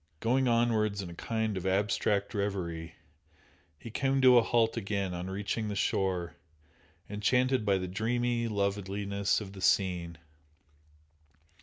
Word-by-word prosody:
Going 130 Hz, +6 st, +2 dB
onwards 110 Hz, -4 st, +1 dB
in 85 Hz, -, -7 dB
a -, -, -8 dB
kind 110 Hz, +3 st, -2 dB
of 95 Hz, +1 st, -3 dB
abstract 100 Hz, +1 st, +1 dB
reverie, 85 Hz, -5 st, -3 dB, 0.8 s
he 115 Hz, -, -10 dB
came 135 Hz, +3 st, +1 dB
to 125 Hz, -1 st, +8 dB
a -, -, +4 dB
halt 115 Hz, -1 st, +2 dB
again 100 Hz, -4 st, -2 dB
on 90 Hz, +1 st, -5 dB
reaching 105 Hz, +3 st, -3 dB
the 105 Hz, -, -3 dB
shore, 95 Hz, -3 st, -1 dB, 0.7 s
enchanted 125 Hz, +4 st, +1 dB
by 100 Hz, -1 st, +4 dB
the 90 Hz, -1 st, -3 dB
dreamy 115 Hz, +4 st, -1 dB
loveliness 100 Hz, -1 st, -1 dB
of 100 Hz, -2 st, -8 dB
the 95 Hz, -, -10 dB
scene. 90 Hz, -4 st, +1 dB
100 Hz, 135 wpm, -30 LUFS, 95-115 Hz, 0.8 s, to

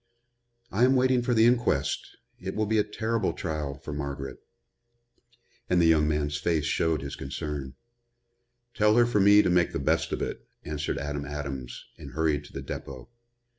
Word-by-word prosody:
"I 110 Hz, +5 st, +2 dB
am 130 Hz, +1 st, +5 dB
waiting 130 Hz, -1 st, +3 dB
for 120 Hz, 0 st, 0 dB
the 110 Hz, 0 st, +6 dB
inquest. 120 Hz, -, +1 dB, 0.2 s
It 95 Hz, +1 st, -5 dB
will 110 Hz, -, +1 dB
be 110 Hz, +1 st, +2 dB
a -, -, +4 dB
terrible 110 Hz, +2 st, -1 dB
trial 75 Hz, -5 st, -3 dB
for 70 Hz, +2 st, -8 dB
Margaret." 70 Hz, -2 st, -5 dB, 1.3 s
And 90 Hz, -, +3 dB
the 85 Hz, -, +4 dB
young 80 Hz, -2 st, +4 dB
man's 75 Hz, -1 st, 0 dB
face 80 Hz, -2 st, 0 dB
showed 80 Hz, -2 st, 0 dB
his 70 Hz, -, -5 dB
concern. 70 Hz, -1 st, -5 dB, 1.0 s
"Tell 105 Hz, 0 st, +3 dB
her 120 Hz, 0 st, +6 dB
for 120 Hz, -3 st, +1 dB
me 100 Hz, +1 st, +7 dB
to -, -, +1 dB
make 90 Hz, -1 st, +2 dB
the -, -, -1 dB
best 80 Hz, +4 st, +1 dB
of -, -, -2 dB
it," -, -, -5 dB, 0.2 s
answered 75 Hz, -1 st, -3 dB
Adam 75 Hz, 0 st, -3 dB
Adams 70 Hz, -4 st, -6 dB
and -, -, -10 dB
hurried 75 Hz, -2 st, 0 dB
to -, -, -14 dB
the -, -, -5 dB
depot. 65 Hz, -3 st, -7 dB
80 Hz, 175 wpm, -27 LUFS, 70-105 Hz, 1.3 s, me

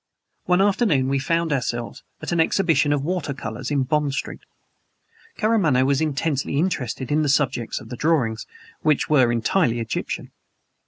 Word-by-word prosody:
One 180 Hz, +1 st, +3 dB
afternoon 190 Hz, -, +2 dB
we 135 Hz, 0 st, +1 dB
found 165 Hz, +3 st, 0 dB
ourselves 120 Hz, 0 st, -3 dB, 0.2 s
at -, -, -4 dB
an 170 Hz, -, +1 dB
exhibition 160 Hz, -4 st, +2 dB
of 145 Hz, -2 st, 0 dB
water 160 Hz, -4 st, -2 dB
colors 120 Hz, +1 st, -5 dB
in 140 Hz, -2 st, +1 dB
Bond 145 Hz, +1 st, 0 dB
Street. -, -, -4 dB, 1.0 s
Karamaneh 190 Hz, -, +2 dB
was 140 Hz, +1 st, +1 dB
intensely 145 Hz, -2 st, -1 dB
interested 135 Hz, -7 st, -2 dB
in 150 Hz, +1 st, +3 dB
the 150 Hz, -, +1 dB
subjects 135 Hz, -5 st, 0 dB
of 110 Hz, -, -13 dB
the 125 Hz, -, -5 dB
drawings 130 Hz, -8 st, 0 dB, 0.3 s
which 155 Hz, -1 st, +1 dB
were 130 Hz, -5 st, +5 dB
entirely 120 Hz, +2 st, +1 dB
Egyptian. 115 Hz, -1 st, -4 dB
145 Hz, 155 wpm, -23 LUFS, 130-160 Hz, 1.0 s, were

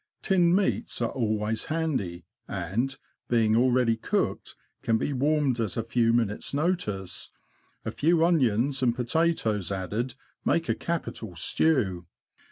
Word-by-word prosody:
Tinned 180 Hz, -3 st, +4 dB
meats 200 Hz, 0 st, 0 dB
are 120 Hz, -1 st, 0 dB
always 110 Hz, -2 st, -1 dB
handy, 130 Hz, -, -2 dB, 0.2 s
and, 115 Hz, +11 st, -2 dB, 0.3 s
being 110 Hz, -2 st, +3 dB
already 125 Hz, -1 st, +3 dB
cooked, 110 Hz, -, -2 dB, 0.3 s
can 115 Hz, -, +2 dB
be 145 Hz, -, -1 dB
warmed 140 Hz, -2 st, +1 dB
at 110 Hz, -5 st, -2 dB
a 115 Hz, -, 0 dB
few 115 Hz, 0 st, +2 dB
minutes' 115 Hz, +2 st, 0 dB
notice; 140 Hz, -, -2 dB, 0.6 s
a -, -, -2 dB
few 165 Hz, +1 st, +3 dB
onions 135 Hz, -4 st, +2 dB
and 120 Hz, -2 st, +2 dB
potatoes 120 Hz, -, 0 dB
added 105 Hz, +6 st, -3 dB, 0.3 s
make 165 Hz, -1 st, +1 dB
a -, -, +2 dB
capital 115 Hz, -, -4 dB
stew. 95 Hz, -, +1 dB
120 Hz, 130 wpm, -27 LUFS, 110-150 Hz, 0.6 s, Tinned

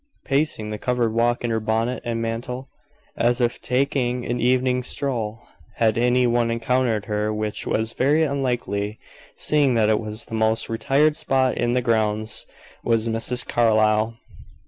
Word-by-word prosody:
Pacing 135 Hz, -7 st, 0 dB
the 105 Hz, -, -5 dB
covered 120 Hz, -3 st, 0 dB
walk 120 Hz, +1 st, +1 dB
in 120 Hz, -, -1 dB
her 110 Hz, -, +1 dB
bonnet 110 Hz, +3 st, -1 dB
and 120 Hz, -1 st, -2 dB
mantle, 120 Hz, +3 st, -4 dB, 0.5 s
as 120 Hz, +1 st, +2 dB
if 120 Hz, -1 st, 0 dB
taking 125 Hz, -2 st, 0 dB
an 120 Hz, 0 st, -2 dB
evening 125 Hz, +1 st, +2 dB
stroll 120 Hz, -4 st, -4 dB, 0.3 s
had 110 Hz, -1 st, +2 dB
any 125 Hz, +1 st, +3 dB
one 120 Hz, -1 st, +2 dB
encountered 115 Hz, -2 st, 0 dB
her, 105 Hz, 0 st, -1 dB
which 105 Hz, 0 st, -3 dB
was 110 Hz, +1 st, -1 dB
very 150 Hz, +5 st, +2 dB
unlikely, 120 Hz, -7 st, -2 dB, 0.4 s
seeing 145 Hz, -4 st, +2 dB
that 110 Hz, -2 st, +3 dB
it 110 Hz, -, +3 dB
was 110 Hz, +1 st, -6 dB
the -, -, -12 dB
most 110 Hz, 0 st, 0 dB
retired 140 Hz, +6 st, +2 dB
spot 130 Hz, -4 st, +1 dB
in 120 Hz, +1 st, 0 dB
the 125 Hz, -, +1 dB
grounds 110 Hz, -2 st, 0 dB, 0.4 s
was 115 Hz, -1 st, +1 dB
Mrs. 115 Hz, +2 st, 0 dB
Carlyle. 110 Hz, -1 st, +2 dB
120 Hz, 155 wpm, -23 LUFS, 110-125 Hz, 0.5 s, any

